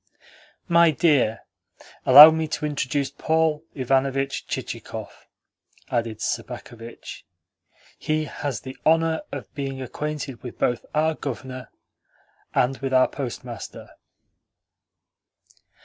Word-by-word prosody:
"My 170 Hz, -1 st, +5 dB
dear, 140 Hz, -7 st, +2 dB, 0.7 s
allow 145 Hz, +5 st, +12 dB
me 160 Hz, 0 st, -1 dB
to 155 Hz, 0 st, -3 dB
introduce 140 Hz, -1 st, -1 dB
Paul 160 Hz, +1 st, 0 dB
Ivanovitch 135 Hz, +1 st, 0 dB
Chichikov," -, -, -6 dB, 0.6 s
added 115 Hz, -2 st, -2 dB
Sobakevitch. 115 Hz, -1 st, -6 dB, 0.8 s
"He 155 Hz, 0 st, -1 dB
has 145 Hz, -3 st, -4 dB
the 130 Hz, 0 st, -8 dB
honour 160 Hz, 0 st, +2 dB
of -, -, -7 dB
being 135 Hz, -2 st, -4 dB
acquainted 140 Hz, -1 st, -5 dB
both 125 Hz, -, -9 dB
with 120 Hz, -, -9 dB
our 160 Hz, +1 st, +2 dB
Governor 130 Hz, -3 st, -6 dB, 0.9 s
and 130 Hz, +2 st, +1 dB
with 135 Hz, -1 st, -3 dB
our 130 Hz, -, +5 dB
Postmaster." 120 Hz, -3 st, -7 dB
135 Hz, 100 wpm, -24 LUFS, 130-155 Hz, 0.9 s, allow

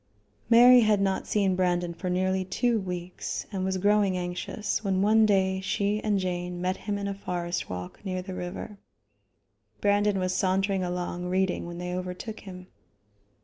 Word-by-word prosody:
Mary 245 Hz, +2 st, +8 dB
had 215 Hz, -3 st, +3 dB
not 195 Hz, -1 st, 0 dB
seen 195 Hz, -3 st, +2 dB
Brandon 175 Hz, -1 st, 0 dB
for 180 Hz, +2 st, -4 dB
nearly 185 Hz, +1 st, +1 dB
two 230 Hz, +5 st, 0 dB
weeks, 180 Hz, -2 st, -5 dB
and 190 Hz, -2 st, -2 dB
was 190 Hz, 0 st, 0 dB
growing 200 Hz, -1 st, +2 dB
anxious, 180 Hz, +4 st, -3 dB
when 190 Hz, -1 st, +1 dB
one 220 Hz, +1 st, +5 dB
day 190 Hz, -2 st, +2 dB
she 200 Hz, +2 st, -1 dB
and 210 Hz, -2 st, +1 dB
Jane 180 Hz, -1 st, -3 dB
met 185 Hz, +1 st, 0 dB
him 205 Hz, +1 st, -3 dB
in 200 Hz, 0 st, -3 dB
a 200 Hz, -, -2 dB
forest 175 Hz, -3 st, -3 dB
walk 90 Hz, -, -7 dB
near 185 Hz, -2 st, -3 dB
the 190 Hz, 0 st, -7 dB
river. 185 Hz, +3 st, -6 dB, 1.0 s
Brandon 205 Hz, 0 st, +2 dB
was 185 Hz, -1 st, 0 dB
sauntering 195 Hz, 0 st, +1 dB
along 180 Hz, 0 st, -3 dB
reading 185 Hz, 0 st, 0 dB
when 175 Hz, 0 st, -7 dB
they 180 Hz, 0 st, -4 dB
overtook 185 Hz, +4 st, -5 dB
him. 185 Hz, -2 st, -10 dB
190 Hz, 165 wpm, -27 LUFS, 180-200 Hz, 1.0 s, Mary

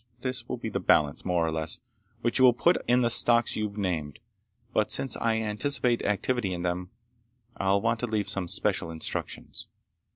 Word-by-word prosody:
This 130 Hz, 0 st, -4 dB
will -, -, -3 dB
be -, -, -5 dB
the -, -, -2 dB
balance, 75 Hz, -2 st, +2 dB
more 90 Hz, -2 st, +1 dB
or 80 Hz, -, -1 dB
less, 80 Hz, 0 st, -2 dB, 0.4 s
which 120 Hz, +2 st, +1 dB
you 130 Hz, -, +7 dB
will 125 Hz, -, +7 dB
put 170 Hz, +9 st, +2 dB
in 125 Hz, +1 st, +4 dB
the 120 Hz, -, +2 dB
stocks 120 Hz, 0 st, +3 dB
you've 105 Hz, -1 st, -3 dB
named, 80 Hz, -8 st, -2 dB, 0.6 s
but -, -, +1 dB
since 135 Hz, -, -1 dB
I 115 Hz, -1 st, +1 dB
anticipate 120 Hz, +3 st, +2 dB
activity 105 Hz, 0 st, -1 dB
in 85 Hz, -, -5 dB
them. 90 Hz, +1 st, -2 dB, 0.7 s
I'll 100 Hz, +1 st, +1 dB
want 115 Hz, +1 st, 0 dB
to 120 Hz, -, -2 dB
leave 110 Hz, -2 st, -1 dB
some 95 Hz, -3 st, -1 dB
special 85 Hz, -, +2 dB
instructions." 80 Hz, -1 st, -6 dB
105 Hz, 185 wpm, -27 LUFS, 90-120 Hz, 0.7 s, you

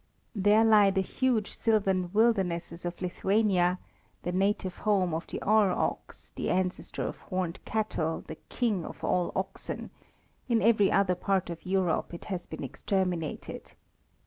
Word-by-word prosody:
There 210 Hz, +1 st, +4 dB
lie 210 Hz, -3 st, +6 dB
the 190 Hz, 0 st, +1 dB
huge 230 Hz, +1 st, 0 dB
Sylvan 195 Hz, -5 st, +1 dB
wildernesses 185 Hz, -6 st, +1 dB
of 175 Hz, 0 st, -4 dB
Lithuania, 185 Hz, -1 st, +2 dB, 0.5 s
the 175 Hz, -, -2 dB
native 190 Hz, 0 st, 0 dB
home 195 Hz, -5 st, +1 dB
of 165 Hz, +2 st, -3 dB
the -, -, -5 dB
Ure 210 Hz, -2 st, +4 dB
ox, -, -, -3 dB
the -, -, -2 dB
ancestor 185 Hz, 0 st, -1 dB
of -, -, -4 dB
horned 185 Hz, -2 st, -4 dB
cattle, 190 Hz, -7 st, -1 dB
the 160 Hz, -, -8 dB
king 215 Hz, -8 st, 0 dB
of -, -, -9 dB
all 180 Hz, -1 st, +1 dB
oxen; -, -, -4 dB, 0.6 s
in 235 Hz, -2 st, +3 dB
every 215 Hz, -3 st, +4 dB
other 195 Hz, -2 st, +3 dB
part 190 Hz, 0 st, 0 dB
of 170 Hz, +1 st, -8 dB
Europe 185 Hz, -2 st, 0 dB
it -, -, -10 dB
has 185 Hz, -4 st, -4 dB
been -, -, -7 dB
exterminated. 180 Hz, -5 st, -3 dB
190 Hz, 145 wpm, -29 LUFS, 180-210 Hz, 0.6 s, lie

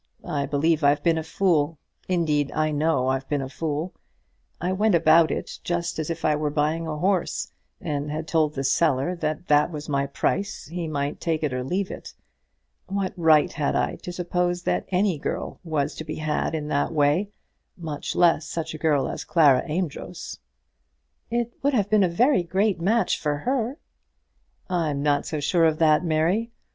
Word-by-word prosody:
I 140 Hz, -2 st, -2 dB
believe 155 Hz, +2 st, +1 dB
I've 145 Hz, +1 st, +3 dB
been 165 Hz, -2 st, +3 dB
a -, -, -4 dB
fool. 160 Hz, -3 st, +1 dB, 0.3 s
Indeed, 155 Hz, -5 st, +1 dB
I 155 Hz, 0 st, +1 dB
know 145 Hz, -3 st, +1 dB
I've 135 Hz, 0 st, -2 dB
been 145 Hz, -2 st, 0 dB
a -, -, -4 dB
fool. 155 Hz, +4 st, -3 dB, 0.7 s
I 180 Hz, +2 st, -1 dB
went 205 Hz, +1 st, +2 dB
about 160 Hz, 0 st, +5 dB
it -, -, -4 dB
just 170 Hz, -1 st, -2 dB
as 155 Hz, -, -3 dB
if 165 Hz, 0 st, -3 dB
I 155 Hz, -, +3 dB
were 150 Hz, 0 st, -1 dB
buying 155 Hz, +3 st, 0 dB
a 155 Hz, -1 st, -3 dB
horse, 185 Hz, +2 st, 0 dB, 0.3 s
and 145 Hz, -2 st, -3 dB
had 155 Hz, +2 st, -4 dB
told 155 Hz, -2 st, +1 dB
the 135 Hz, -, -2 dB
seller 140 Hz, +3 st, +2 dB
that 155 Hz, +1 st, -3 dB
that 150 Hz, +1 st, +4 dB
was 150 Hz, -3 st, -7 dB
my 140 Hz, -1 st, 0 dB
price, 195 Hz, +7 st, -2 dB
he 170 Hz, +3 st, -5 dB
might 145 Hz, -1 st, -2 dB
take 160 Hz, -2 st, -1 dB
it 145 Hz, -4 st, 0 dB
or 125 Hz, 0 st, -2 dB
leave 185 Hz, +8 st, -2 dB
it. -, -, -9 dB, 0.7 s
What 195 Hz, -1 st, -2 dB
right 160 Hz, -3 st, +4 dB
had 145 Hz, -3 st, -1 dB
I -, -, 0 dB
to 180 Hz, -, -7 dB
suppose 175 Hz, 0 st, -1 dB
that 90 Hz, 0 st, -1 dB
any 185 Hz, -3 st, +1 dB
girl -, -, -4 dB
was 150 Hz, -3 st, -1 dB
to -, -, -5 dB
be 155 Hz, 0 st, -5 dB
had 155 Hz, +1 st, -1 dB
in 150 Hz, -1 st, -3 dB
that 145 Hz, +2 st, 0 dB
way; 155 Hz, +6 st, +2 dB, 0.5 s
much 155 Hz, -5 st, -5 dB
less 165 Hz, -3 st, +3 dB
such 165 Hz, -2 st, -4 dB
a 155 Hz, -, -7 dB
girl 150 Hz, -4 st, +2 dB
as -, -, -5 dB
Clara 145 Hz, -7 st, +4 dB
Amedroz?" 160 Hz, -, -4 dB, 0.9 s
"It 235 Hz, 0 st, -1 dB
would 280 Hz, 0 st, +1 dB
have 205 Hz, -3 st, 0 dB
been 215 Hz, -1 st, +5 dB
a 190 Hz, +5 st, +3 dB
great 190 Hz, +1 st, 0 dB
match 220 Hz, +6 st, +2 dB
for 150 Hz, -1 st, -1 dB
her." 250 Hz, -, -1 dB, 0.9 s
"I'm 155 Hz, -6 st, -1 dB
not 145 Hz, -1 st, +1 dB
so 155 Hz, -, -3 dB
sure 165 Hz, +3 st, +2 dB
of 160 Hz, -1 st, +2 dB
that, 155 Hz, 0 st, +4 dB
Mary. 170 Hz, +8 st, +1 dB
160 Hz, 185 wpm, -24 LUFS, 150-180 Hz, 0.9 s, about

